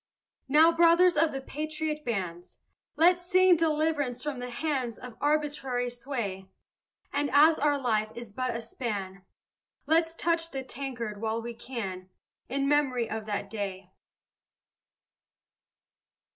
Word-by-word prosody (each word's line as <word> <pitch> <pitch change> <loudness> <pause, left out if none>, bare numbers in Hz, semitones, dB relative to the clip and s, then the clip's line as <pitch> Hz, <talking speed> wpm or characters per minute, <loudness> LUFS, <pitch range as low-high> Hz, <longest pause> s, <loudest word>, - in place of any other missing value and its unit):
Now, 310 +4 +6
brothers 340 +2 +5
of 320 +1 +3
the 270 - -4
patriot 305 +2 -4
bands, 180 - -4 0.4
Let's 355 +2 +4
sing 370 0 +5
deliverance 305 -6 0
from 290 -4 -3
the 250 0 -5
hands 255 -3 -2
Of 245 -2 -10
arbitrary 285 -5 0
sway. 235 -7 -5 0.6
And 285 0 0
as 310 +3 +6
our 290 -1 +2
life 220 -5 0
is 235 -2 -8
but 255 +3 -2
a 230 - -3
span, 200 -5 -5 0.6
Let's 325 +2 +2
touch 330 0 0
the 270 -3 -5
tankard 240 -6 -5
while 225 0 -1
we 235 +1 -6
can, 195 -7 -6 0.4
In 275 +2 0
memory 270 -5 +2
of 220 0 -5
that 205 -1 -2
day. 195 -3 -5
265 Hz, 130 wpm, -28 LUFS, 225-310 Hz, 0.6 s, Now